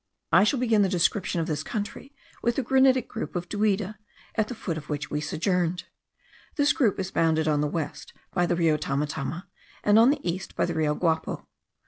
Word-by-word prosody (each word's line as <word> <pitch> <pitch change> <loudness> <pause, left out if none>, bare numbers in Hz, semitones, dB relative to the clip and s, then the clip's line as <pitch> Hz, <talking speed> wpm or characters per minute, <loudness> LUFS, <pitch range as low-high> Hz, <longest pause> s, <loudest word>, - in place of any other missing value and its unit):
I - - +7
shall 270 - +2
begin 225 -4 +3
the 195 - +3
description 180 -1 +1
of - - -1
this 155 -3 -2
country 220 - -5 0.3
with 235 0 +1
the 270 - 0
granitic 260 0 +4
group 225 - -6
of 175 0 -3
Duida, 210 0 0 0.3
at 220 -2 0
the 250 - -6
foot 175 -6 -4
of 150 -2 -8
which 145 -2 -3
we 150 - -1
sojourned. 180 +2 0 0.7
This 290 -1 +3
group 240 - +1
is 190 0 -3
bounded 160 -1 +2
on 150 -1 +2
the 150 - +1
west 155 0 -4 0.2
by 175 -1 +2
the 175 - +1
Rio 165 -3 +2
Tamatama, 150 +3 -3 0.4
and 210 +1 +5
on 235 +3 +7
the 285 -9 -1
east 175 +2 -4
by - - +1
the 175 - -2
Rio 155 -2 +1
Guapo. 160 -1 -1
180 Hz, 200 wpm, -26 LUFS, 160-215 Hz, 0.7 s, I